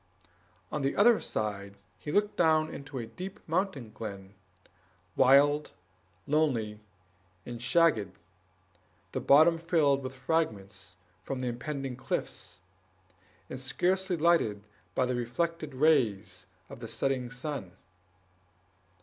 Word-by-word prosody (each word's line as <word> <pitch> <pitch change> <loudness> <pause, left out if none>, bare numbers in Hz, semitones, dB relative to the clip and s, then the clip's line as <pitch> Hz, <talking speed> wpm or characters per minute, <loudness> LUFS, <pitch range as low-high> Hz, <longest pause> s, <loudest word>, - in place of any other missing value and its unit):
On 150 - -2
the 135 0 0
other 225 +2 +6
side 100 -2 -4 0.2
he 150 - -5
looked 205 +4 +1
down 155 -2 +3
into 140 -1 -8
a 120 - -3
deep 185 - -8
mountain 160 - -1
glen, 100 -3 -8 0.8
wild, 145 +3 +5 0.5
lonely, 125 -9 +1 0.7
and 120 -1 -7
shagged, 120 - +2 0.9
the - - -2
bottom 160 +4 +6
filled 160 -5 +2
with 130 0 -6
fragments 110 - -2 0.3
from 130 +7 -4
the 125 - -1
impending 135 +1 -4
cliffs, 120 -6 -4 0.9
and 130 - -6
scarcely 180 +7 0
lighted 155 -11 +2 0.3
by 130 - +2
the 125 - -1
reflected 145 +5 -2
rays 110 - +2 0.2
of - - -10
the 115 - -7
setting 130 0 -1
sun. 125 - -5
135 Hz, 115 wpm, -30 LUFS, 115-160 Hz, 0.9 s, other